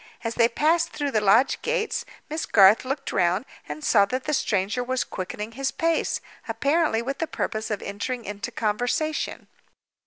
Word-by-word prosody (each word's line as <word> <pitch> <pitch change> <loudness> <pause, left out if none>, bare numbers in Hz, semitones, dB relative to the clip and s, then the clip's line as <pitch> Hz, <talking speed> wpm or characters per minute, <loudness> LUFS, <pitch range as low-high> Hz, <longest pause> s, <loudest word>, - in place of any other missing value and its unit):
As 230 -1 -2
they 230 0 +4
passed 315 +7 +2
through 290 -2 -3
the 215 - +2
lodge 210 +6 +4
gates, 470 -2 -1 0.2
Miss 310 +2 -3
Garth 200 +3 +6
looked 270 +1 -3
round, 185 +5 +1 0.2
and 150 +1 -6
saw 200 -3 +5
that 255 +5 -3
the 300 - -2
stranger 210 -1 0
was 255 0 0
quickening 210 +3 -6
his 270 +3 -2
pace, 330 0 0 0.3
apparently 285 -5 +1
with 275 +3 -4
the 325 - -1
purpose 215 -6 -3
of 210 -2 -3
entering 230 +5 -4
into 205 0 -5
conversation. 245 +9 -1
245 Hz, 165 wpm, -25 LUFS, 205-285 Hz, 0.3 s, Garth